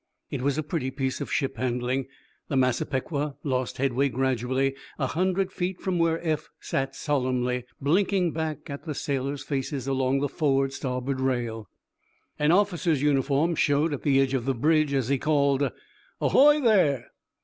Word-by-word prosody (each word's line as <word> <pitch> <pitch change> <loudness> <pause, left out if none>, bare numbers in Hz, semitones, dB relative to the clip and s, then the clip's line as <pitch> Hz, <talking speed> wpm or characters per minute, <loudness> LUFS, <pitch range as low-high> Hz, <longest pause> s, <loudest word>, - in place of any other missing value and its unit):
It - - -3
was 140 +1 0
a 155 - 0
pretty 150 -3 -2
piece 130 0 -3
of - - -4
ship 135 -2 -1
handling. 125 +1 -1 0.4
The 140 - -2
"Massapequa" 135 +3 0
lost 130 -3 -1
headway 135 +1 +1
gradually 130 +1 0 0.2
a 135 - 0
hundred 185 +6 0
feet 180 0 -3
from 185 -2 -1
where 165 0 +2
Eph 155 -2 -1
sat 135 0 -2
solemnly 125 -3 -1
blinking 180 +4 +2
back 160 -2 -4
at 140 +3 -7
the 155 -3 -4
sailors' 140 0 -2
faces 135 -1 -3
along 135 0 +1
the 145 - +1
forward 135 -3 +1
starboard 130 0 -3
rail. 120 -5 -2 0.7
An 150 +1 +3
officer's 175 -6 +2
uniform 145 +3 +2
showed 150 0 +2
at 140 - -4
the 135 -2 +3
edge 135 -1 +2
of 125 -3 -1
the 135 -1 0
bridge, 155 +3 +2
as 135 -4 0
he 140 -1 +2
called: 140 -2 +2 0.5
"Ahoy, 295 +2 +5
there!" 180 - +3
140 Hz, 160 wpm, -26 LUFS, 130-155 Hz, 0.7 s, Ahoy